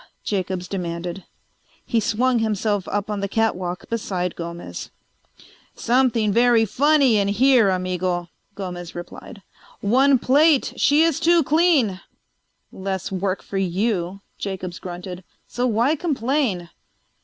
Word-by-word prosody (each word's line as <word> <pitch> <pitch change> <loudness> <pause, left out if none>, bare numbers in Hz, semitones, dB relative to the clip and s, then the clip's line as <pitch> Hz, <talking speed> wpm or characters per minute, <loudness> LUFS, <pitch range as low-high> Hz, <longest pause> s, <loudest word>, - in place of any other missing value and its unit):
Jacobs 185 -2 -2
demanded. 175 -1 -5 0.6
He 230 - +1
swung 240 +3 +1
himself 210 -2 -1
up 205 +1 -2
on 205 - -2
the 200 - -2
catwalk 185 -4 -1
beside 185 -6 -3
Gomez. 170 0 -7 0.9
"Something 235 -4 +2
very 235 -1 +4
funny 275 +1 +3
in 200 -1 +1
here, 235 +1 +4
amigo," 180 -1 -1 0.3
Gomez 180 -3 -6
replied. 175 +4 -9 0.4
"One 260 +6 +4
plate 285 +4 +3
she 295 +3 +4
is 330 -1 +1
too 335 0 +4
clean." 285 - +2 0.7
"Less 190 -1 -4
work 190 0 -2
for 195 - -4
you," 190 0 -1 0.2
Jacobs 185 -3 -5
grunted. 180 0 -7 0.2
"So 245 +1 -1
why 240 +6 +2
complain?" 260 - -1
205 Hz, 120 wpm, -22 LUFS, 185-250 Hz, 0.9 s, very